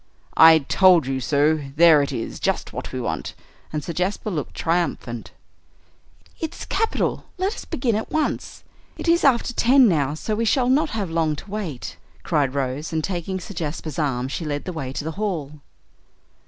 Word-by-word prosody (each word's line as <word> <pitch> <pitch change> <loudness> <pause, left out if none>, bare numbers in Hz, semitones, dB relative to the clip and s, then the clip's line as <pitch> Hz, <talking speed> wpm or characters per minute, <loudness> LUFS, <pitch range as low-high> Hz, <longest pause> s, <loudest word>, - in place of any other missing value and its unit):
"I 160 0 +9
told 170 +2 +4
you 135 0 -2
so! 150 +4 +2 0.2
There 160 -2 +7
it 140 - -2
is, 115 -4 -5
just - - -1
what - - -6
we - - -4
want." - - -4 0.4
And 150 -1 -3
Sir 170 - -5
Jasper 190 +5 -2
looked 150 -6 -4
triumphant. 165 -9 -2 1.1
"It's 320 - -5
capital 450 - -1
let 380 +3 0
us - - -8
begin 240 -3 -1
at 220 - -3
once. 310 -1 -2 0.3
It - - -5
is 340 +1 +4
after 245 -2 +3
ten 255 +2 +5
now, 150 -6 +1
so 215 +7 -3
we 220 +2 0
shall 250 +2 +2
not 300 +4 +3
have 200 - -3
long 160 -2 +1
to 195 +7 -11
wait," 190 -11 -5 0.3
cried 140 -3 0
Rose, 140 +3 -2
and, 160 -1 -1
taking 185 +1 -3
Sir 185 - -9
Jasper's 155 -2 -4
arm, 130 -4 0
she 140 - -4
led 145 -2 -3
the 185 - -4
way 135 -5 -4
to 140 - -4
the 160 - -3
hall. 155 -8 -3
165 Hz, 180 wpm, -23 LUFS, 145-210 Hz, 1.1 s, I